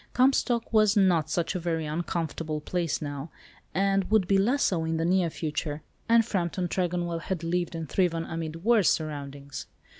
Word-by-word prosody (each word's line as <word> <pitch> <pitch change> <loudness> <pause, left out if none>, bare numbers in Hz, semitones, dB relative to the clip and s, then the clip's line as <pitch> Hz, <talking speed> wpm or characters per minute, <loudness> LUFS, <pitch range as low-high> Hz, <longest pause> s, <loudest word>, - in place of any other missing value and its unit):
Comstock 250 -3 +2
was 215 -1 +4
not 175 -6 +3
such 165 +3 0
a 185 - -2
very 165 -2 -1
uncomfortable 160 -1 -3
place 170 0 -2
now, 145 +1 -5 0.4
and 195 +1 +1
would 215 -4 +3
be 195 0 +4
less 250 +8 +2
so 170 -4 +1
in 160 0 -1
the 165 - 0
near 180 -1 +2
future, 155 -1 -4 0.3
and 230 -1 +5
Frampton 180 -4 -1
Tregonwell 175 -1 -1
had 175 0 -4
lived 175 0 -1
and 165 -1 -4
thriven 165 0 +1
amid 165 0 -5
worse 225 -4 +4
surroundings. 140 -3 -4
170 Hz, 170 wpm, -27 LUFS, 160-195 Hz, 0.4 s, and